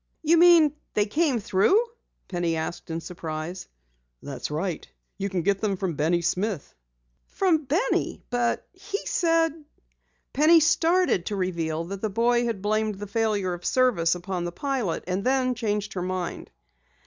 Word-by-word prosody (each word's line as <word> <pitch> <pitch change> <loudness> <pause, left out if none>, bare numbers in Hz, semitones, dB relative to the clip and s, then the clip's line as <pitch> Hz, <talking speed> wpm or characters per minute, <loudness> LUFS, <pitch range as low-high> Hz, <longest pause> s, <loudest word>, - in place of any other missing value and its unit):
"You 325 +2 +4
mean 335 -3 +6 0.2
they 210 - +3
came 280 +2 +1
through?" 210 - +3 0.5
Penny 175 -3 -1
asked 160 +2 -5
in 165 0 -3
surprise. 165 0 -6 0.6
"That's - - -5
right. 165 +4 -3 0.3
You 200 +1 -1
can 185 -3 -2
get 200 +1 +1
them 205 -3 0
from 185 -3 -2
Benny 165 +4 +1
Smith." 185 - -2 0.5
"From 330 -6 +1
Benny? 355 - 0
But 245 -1 0
he 395 +2 -6
said 330 -2 +2 0.4
" - - -46
Penny 310 +4 +6
started 325 - +2
to 210 - -2
reveal 170 -4 -2
that 195 +3 -7
the 220 - -1
boy 240 +3 +2
had 225 -5 -3
blamed 215 0 0
the 205 +2 -7
failure 205 -3 0
of 175 0 -8
service 195 -11 +2
upon 180 0 -4
the 175 - -3
pilot, 255 - -2
and 185 +2 -2
then 255 0 +2
changed 210 -3 -2
her 180 - -3
mind. 185 -1 -4
205 Hz, 160 wpm, -25 LUFS, 175-265 Hz, 0.6 s, mean